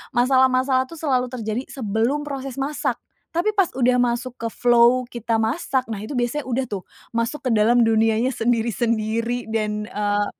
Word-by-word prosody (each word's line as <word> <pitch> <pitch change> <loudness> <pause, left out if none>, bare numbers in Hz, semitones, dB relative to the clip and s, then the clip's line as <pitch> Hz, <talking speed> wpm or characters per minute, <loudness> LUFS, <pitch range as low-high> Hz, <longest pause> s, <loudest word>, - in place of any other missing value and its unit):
masalah-masalah 260 +1 +3
tu 330 - -10
selalu 255 -5 +1
terjadi 230 0 -3
sebelum 235 +4 -1
proses 270 -2 -5
masak. 285 +2 -1 0.4
Tapi 385 +6 0
pas 390 -4 +3
udah 250 0 +3
masuk 240 +1 -1
ke 230 - -1
flow 240 +1 +4
kita 235 -2 -2
masak, 260 +2 0
nah 215 -3 -5
itu 215 - -7
biasanya 245 +4 -1
udah 255 +2 0
tuh, 200 -4 -4 0.3
masuk 230 +5 -2
ke - - +1
dalam 230 +2 +4
dunianya 225 +3 +2
sendiri-sendiri 230 0 0
dan 210 -1 -1
eee, 205 -2 0
240 Hz, 155 wpm, -22 LUFS, 225-260 Hz, 0.4 s, flow